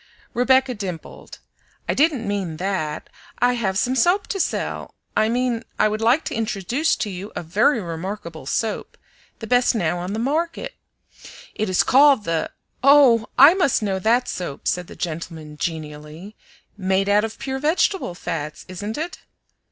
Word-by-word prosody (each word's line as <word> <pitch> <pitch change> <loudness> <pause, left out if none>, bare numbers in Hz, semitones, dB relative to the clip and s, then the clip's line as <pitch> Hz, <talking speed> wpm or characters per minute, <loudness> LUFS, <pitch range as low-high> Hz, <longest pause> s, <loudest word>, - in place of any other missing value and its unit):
Rebecca 260 +1 +3
dimpled. 190 -7 -7 0.5
"I - - +1
didn't 280 -7 +2
mean 195 -6 -2
THAT; 180 -5 -3 0.3
I 245 +1 +3
have 200 -6 -1
some 250 +5 +1
soap 355 - +3
to 390 - -2
sell; - - -2 0.2
I 215 - +3
mean 245 -1 0
I - - +4
would 215 +1 -2
like 245 +8 +3
to - - -3
introduce 225 - 0
to 215 - -3
you 190 +3 -7
a - - -4
very 215 - +2
remarkable 170 -3 -6
soap, 220 +7 -2 0.4
the 225 - -7
best 245 +2 +3
now 175 -4 0
on 180 +3 -4
the - - -2
market. 330 - -2 0.8
It 215 - -2
is 185 - +3
called 275 -3 +5
the" 165 -3 -1 0.3
"Oh! 265 -5 +6
I 280 +6 +9
must 335 - +1
know 195 -2 -1
that 235 +5 +2
soap," 175 -6 -5
said 180 -1 -1
the - - -11
gentleman 160 -2 -6
genially. 155 +4 -6 0.4
"Made 190 -1 0
out 205 +1 +4
of 225 0 -4
pure 265 -1 -4
vegetable 310 - +1
fats, 150 -3 -5
isn't 205 +4 -5
it?" 330 +3 -4
215 Hz, 160 wpm, -22 LUFS, 180-255 Hz, 0.8 s, I